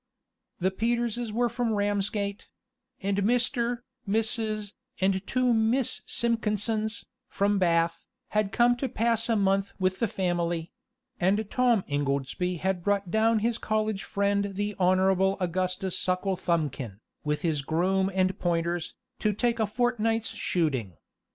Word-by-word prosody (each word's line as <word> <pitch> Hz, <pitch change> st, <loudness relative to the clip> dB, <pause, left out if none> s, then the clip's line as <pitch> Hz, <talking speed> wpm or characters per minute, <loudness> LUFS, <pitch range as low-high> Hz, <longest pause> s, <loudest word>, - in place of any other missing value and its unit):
The 190 Hz, +1 st, +1 dB
Peterses 235 Hz, +2 st, -1 dB
were 240 Hz, +3 st, +2 dB
from 235 Hz, -1 st, -1 dB
Ramsgate; 205 Hz, 0 st, -1 dB, 0.6 s
and 200 Hz, 0 st, 0 dB
Mr., 240 Hz, +2 st, +1 dB, 0.3 s
Mrs., 215 Hz, -1 st, 0 dB, 0.3 s
and 190 Hz, +1 st, +3 dB
the 190 Hz, -, -1 dB
two 250 Hz, +5 st, +1 dB
Miss 230 Hz, +3 st, +2 dB
Simpkinsons, 220 Hz, -1 st, 0 dB, 0.2 s
from 200 Hz, 0 st, +1 dB
Bath, 170 Hz, -2 st, +2 dB, 0.3 s
had 210 Hz, -2 st, 0 dB
come 240 Hz, +1 st, +4 dB
to 265 Hz, +1 st, -2 dB
pass 230 Hz, 0 st, +1 dB
a 230 Hz, -, +3 dB
month 195 Hz, -1 st, +1 dB
with 185 Hz, 0 st, 0 dB
the 230 Hz, -, +2 dB
family; 175 Hz, -3 st, -1 dB, 0.5 s
and 200 Hz, +3 st, +2 dB
Tom 240 Hz, -6 st, +3 dB
Ingoldsby 145 Hz, +5 st, -1 dB
had 190 Hz, -1 st, 0 dB
brought 200 Hz, -2 st, 0 dB
down 225 Hz, +2 st, +3 dB
his 235 Hz, -1 st, 0 dB
college 215 Hz, -2 st, -1 dB
friend 200 Hz, 0 st, 0 dB
the 205 Hz, +1 st, -1 dB
Honorable 190 Hz, +1 st, +3 dB
Augustus 185 Hz, +1 st, -1 dB
Sucklethumbkin, 170 Hz, -, -1 dB, 0.2 s
with 150 Hz, 0 st, -1 dB
his 155 Hz, -4 st, +1 dB
groom 185 Hz, +6 st, +1 dB
and 185 Hz, 0 st, +1 dB
pointers, 170 Hz, -1 st, -1 dB, 0.2 s
to 210 Hz, -1 st, +1 dB
take 235 Hz, +2 st, 0 dB
a 220 Hz, -, +2 dB
fortnight's 225 Hz, -1 st, 0 dB
shooting. 135 Hz, -, -1 dB
200 Hz, 130 wpm, -27 LUFS, 180-225 Hz, 0.6 s, come